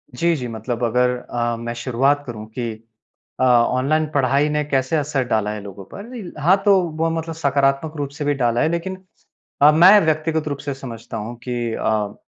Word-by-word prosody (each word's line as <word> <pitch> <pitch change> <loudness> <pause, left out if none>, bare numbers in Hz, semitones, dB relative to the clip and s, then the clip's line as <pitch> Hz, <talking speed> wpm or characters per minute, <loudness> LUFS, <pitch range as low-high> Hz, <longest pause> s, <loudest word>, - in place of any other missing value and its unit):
जी, 170 +5 +2
जी 125 -4 -4
मतलब 115 +1 -4
अगर 125 +2 +2
अ, 120 -1 -3
मैं 120 0 -5
शुरुआत 135 +4 +1
करूँ 110 -4 -7
कि 120 -2 -2 0.7
अ, - - +4
ऑनलाइन 130 +5 +3
पढ़ाई 140 +2 +2
ने 150 0 0
कैसे 135 +1 0
असर 145 -2 0
डाला 110 -3 0
है 105 -1 -5
लोगों 100 -1 -9
पर? 215 -2 -8
हाँ 180 +6 +5
तो 200 -2 +6 0.2
वो 165 - +2
मतलब 165 0 -4
सकारात्मक 140 +1 +1
रूप 145 -1 -3
से 145 - -3
भी 145 - +2
डाला 120 0 +2
है, 155 - +2
लेकिन 170 +3 -3 0.6
अ, 145 +1 +8
मैं 180 +7 +7
व्यक्तिगत 155 0 0
रूप 145 - -3
से 140 0 -4
समझता 120 -5 -8
हूँ 110 +3 -6
कि 120 -2 -3
अ, 105 -2 -1
135 Hz, 190 wpm, -21 LUFS, 120-155 Hz, 0.7 s, अ